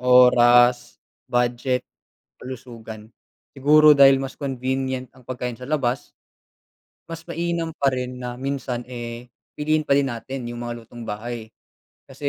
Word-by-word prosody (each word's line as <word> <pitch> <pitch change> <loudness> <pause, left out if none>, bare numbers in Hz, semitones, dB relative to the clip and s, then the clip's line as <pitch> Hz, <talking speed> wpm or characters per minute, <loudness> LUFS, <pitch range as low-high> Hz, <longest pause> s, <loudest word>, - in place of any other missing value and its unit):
oras, 125 -1 +5 0.3
budget, 125 +1 0 0.6
kalusugan. 115 -4 -9 0.5
Siguro 150 +3 +6
dahil 135 -1 +6
mas 135 - -7
convenient 130 -1 -3
ang 130 -2 -21
pagkain 125 -2 -5
sa 125 - -9
labas, 135 -4 -2 0.9
mas 165 0 -8
mainam 170 0 -2
pa 140 - +2
rin 125 0 -4
na 125 -1 -5
minsan, 130 -2 -3
eh, 120 0 -7 0.3
piliin 155 0 0
pa 140 - +4
din 140 -2 +2
natin 125 +2 -6
yung 120 - -7
mga 120 -1 -6
lutong 115 0 -11
bahay. 110 +2 -5 0.6
Kasi 140 +1 -4
125 Hz, 130 wpm, -23 LUFS, 120-135 Hz, 0.9 s, Siguro